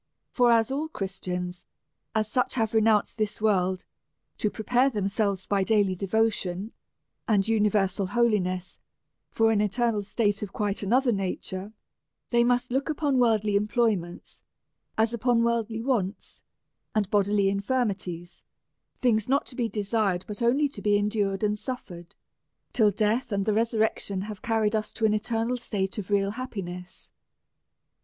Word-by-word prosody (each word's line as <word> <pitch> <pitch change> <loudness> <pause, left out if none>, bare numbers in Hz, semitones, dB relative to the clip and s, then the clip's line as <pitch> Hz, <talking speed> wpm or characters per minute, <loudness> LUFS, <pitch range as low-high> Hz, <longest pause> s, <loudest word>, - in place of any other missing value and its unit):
For 245 -2 +4
as 230 +1 +3
all 295 +4 -1
Christians, 180 - -5 0.5
as 215 -1 +1
such, 250 +4 0
have 225 -3 0
re 220 - +4
nounced 215 -1 +2
this 215 -1 -1
world, 190 -4 +1 0.5
to 210 - +1
prepare 245 +5 +2
themselves, 200 -3 -1
by 200 -1 +1
daily 205 -2 +2
devotion 200 0 -1 0.6
and 205 -3 +2
universal 205 -3 +2
holiness, 195 -5 0 0.5
for 225 0 +2
an 210 -2 +2
eternal 210 +1 +1
state 205 0 0
of 205 -2 -5
quite 205 -1 -1
another 245 +5 +2
nature, 195 0 -3 0.6
they 235 -1 +4
must 245 +1 +1
look 270 +4 0
upon 290 -4 +1
worldly 215 -4 +2
employments 210 -4 -1 0.6
as 220 +1 +2
upon 235 0 +2
worldly 230 -1 -1
wants 225 -7 -2 0.5
and 210 -2 +2
bodily 205 -1 +3
in 200 0 +1
firmities; 195 -7 -2 0.6
things 220 -2 +2
not 275 +1 +2
to 250 - -10
be 235 -2 -1
desired, 205 -3 0
but 210 +2 -7
only 265 +5 +3
to 280 - -8
be 205 -1 +3
en 205 +1 0
dured 200 -2 -1
and 210 0 +1
suffered, 180 -10 -7 0.6
till 220 -5 +4
death 215 +4 0
and 200 -1 0
the 215 - +2
resurrection 220 -3 0
iiave 210 -1 -7
carried 225 -3 +1
us 215 -1 -2
to 225 - -1
an 215 - +3
eternal 230 +2 -1
state 205 -4 -3
of 200 - -7
real 200 -1 +2
happiness. 190 -7 -7
215 Hz, 150 wpm, -27 LUFS, 195-235 Hz, 0.6 s, For